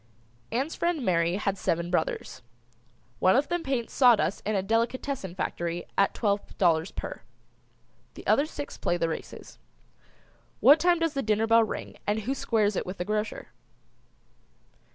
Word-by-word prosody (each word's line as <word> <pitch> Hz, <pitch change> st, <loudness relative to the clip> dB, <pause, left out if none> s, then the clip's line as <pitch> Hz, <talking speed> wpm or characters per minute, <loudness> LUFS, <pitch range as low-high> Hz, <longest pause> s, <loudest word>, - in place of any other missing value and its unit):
Ann's 270 Hz, +7 st, -1 dB
friend 340 Hz, -7 st, -1 dB
Mary 170 Hz, -1 st, +2 dB
has 195 Hz, -1 st, -2 dB
seven 170 Hz, +1 st, -1 dB
brothers. 160 Hz, -3 st, -2 dB, 0.8 s
One 185 Hz, -, +4 dB
of 275 Hz, +3 st, +2 dB
them 350 Hz, -1 st, 0 dB
paints 265 Hz, -6 st, -2 dB
sawdust 245 Hz, -6 st, +4 dB
in 215 Hz, -, 0 dB
a 190 Hz, -, 0 dB
delicatessen 230 Hz, -1 st, -1 dB
factory 175 Hz, -2 st, -3 dB
at 200 Hz, -, +2 dB
twelve 200 Hz, -2 st, -1 dB
dollars 165 Hz, -2 st, +2 dB
per. -, -, -7 dB, 0.9 s
The -, -, -11 dB
other 290 Hz, -, +3 dB
six 290 Hz, -2 st, -7 dB
play 175 Hz, -, 0 dB
the 165 Hz, -1 st, 0 dB
races. 160 Hz, -, -8 dB, 1.0 s
What 285 Hz, +7 st, +7 dB
time 350 Hz, +1 st, +3 dB
does 330 Hz, -2 st, 0 dB
the 275 Hz, -, -1 dB
dinner 215 Hz, -1 st, +1 dB
bell 230 Hz, 0 st, +5 dB
ring 215 Hz, -, -6 dB
and 210 Hz, +1 st, 0 dB
who 250 Hz, +6 st, -2 dB
squares 215 Hz, -6 st, +1 dB
it -, -, -1 dB
with 185 Hz, -, -5 dB
the 180 Hz, -, -3 dB
grocer? 210 Hz, +1 st, -3 dB
215 Hz, 155 wpm, -27 LUFS, 185-270 Hz, 1.0 s, What